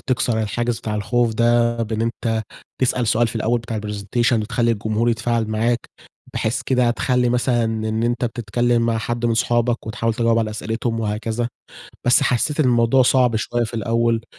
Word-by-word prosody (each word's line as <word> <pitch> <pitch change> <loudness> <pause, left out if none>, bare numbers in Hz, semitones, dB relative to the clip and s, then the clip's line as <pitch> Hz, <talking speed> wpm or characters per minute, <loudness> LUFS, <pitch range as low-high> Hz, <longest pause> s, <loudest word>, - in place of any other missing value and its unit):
تكسر 120 -4 0
الحاجز 120 +2 -2
بتاع 110 -2 -4
الخوف 115 +2 0
ده 120 0 +2
بإن 110 0 -2
أنت 115 -1 -1 0.4
تسأل 125 -2 +1
سؤال 115 +2 +2
في 115 - -5
الأول 115 +2 0
بتاع 115 -2 -4
الpresentation 105 +3 -1
وتخلّي 115 +1 +1
الجمهور 110 +1 0
يتفاعل 115 0 0
معاك، 115 +2 0 0.5
بحيث 110 - -1
كده 125 -2 +2
تخلّي 125 +1 +1
مثلًا 120 -1 +1
إن 110 0 -2
أنت 120 +1 0
بتتكلم 120 0 0
مع 115 -1 +1
حد 120 +1 -2
من 115 - +1
صحابك 120 +1 0
وتحاول 115 +1 -1
تجاوب 115 0 +2
على 110 -1 -1
أسئلتهم 115 +1 -3
وهكذا. 110 +2 -2 0.6
بس 125 +4 +5
حسيت 140 +4 +1
إن 150 - +3
الموضوع 120 +1 +4
صعب 125 -2 +3
شوية 120 +2 -1
في 115 - -7
الأول، 115 +1 0
115 Hz, 170 wpm, -21 LUFS, 110-120 Hz, 0.6 s, بس